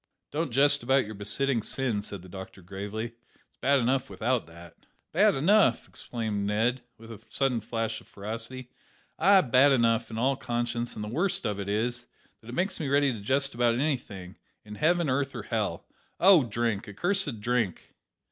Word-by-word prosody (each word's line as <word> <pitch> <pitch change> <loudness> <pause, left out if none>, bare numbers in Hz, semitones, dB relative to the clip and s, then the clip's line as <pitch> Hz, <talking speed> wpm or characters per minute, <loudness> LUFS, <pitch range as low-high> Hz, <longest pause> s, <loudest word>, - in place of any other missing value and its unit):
"Don't 155 0 -1
jest 145 +3 +4
about 130 +1 +2
your 110 - -7
besetting 115 +5 0
sin," 120 -2 -1
said 100 -3 -7
the - - -12
doctor 95 0 -10
gravely; 100 +5 -5 0.4
"it's - - -40
bad 140 +1 +4
enough 130 +1 +1
without 120 -1 -1
that." 85 0 -15 0.2
"Bad 200 +4 +4
enough," 195 +10 +3
exclaimed 110 -4 -3
Ned, 115 +5 +1 0.2
with 115 +1 -12
a 110 - -10
sudden 130 -4 0
flash 115 -1 -3
of - - -20
ferocity; 115 +5 -6 0.5
"ay, 190 +3 +6
bad 130 +2 +5
enough 115 -3 +2
in 110 - -6
all 130 +4 +2
conscience, 120 -1 -3
and 105 - -5
the - - -5
worst 165 - -1
of 105 -2 -2
it 100 0 -4
is, 120 +4 -1 0.3
that 110 - -18
it 120 - -6
makes 190 +3 -1
me 155 - -2
ready 140 -1 +3
to 110 - -7
jest 135 +6 0
about 120 0 +2
anything 115 -9 -3 0.3
in 105 - -9
heaven, 170 +7 +2
earth, 135 +1 -1
or - - -5
hell. - - -2 0.3
Oh, 180 -7 +7
drink! 115 -2 -2
accursed 150 - -1
drink!" 115 -4 -1
120 Hz, 180 wpm, -28 LUFS, 110-140 Hz, 0.5 s, Oh